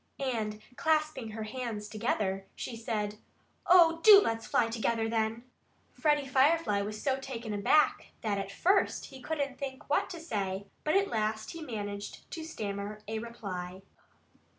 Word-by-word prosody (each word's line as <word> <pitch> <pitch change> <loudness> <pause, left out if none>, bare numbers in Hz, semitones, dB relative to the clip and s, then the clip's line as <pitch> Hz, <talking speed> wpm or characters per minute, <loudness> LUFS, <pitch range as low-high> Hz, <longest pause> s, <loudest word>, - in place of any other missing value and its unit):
And 215 -2 -3
clasping 305 -7 +1
her 220 0 -5
hands 220 -2 -4
together, 205 -3 -1
she 240 - -5
said: 215 -2 -3 0.5
"Oh, 335 -2 +7
do 410 +1 +10
let's 225 - -1
fly 235 - +3
together, 225 0 0
then!" 225 +1 -1 0.5
Freddie 295 -2 +2
Firefly 265 -5 +3
was 210 +1 -4
so 270 +1 0
taken 240 -5 -5
aback 205 +9 +3
that 205 -3 0
at 195 0 -4
first 380 - +2
he 265 - -11
couldn't 280 -1 -3
think 265 -2 -6
what 295 - +2
to 345 - -6
say. 200 - -3 0.2
But 305 - +1
at 395 0 +3
last 220 0 -1
he 335 - -8
managed 205 -7 -6
to 325 - -5
stammer 210 -7 -5
a 220 +1 -2
reply. 190 -5 -6
225 Hz, 150 wpm, -31 LUFS, 210-285 Hz, 0.5 s, do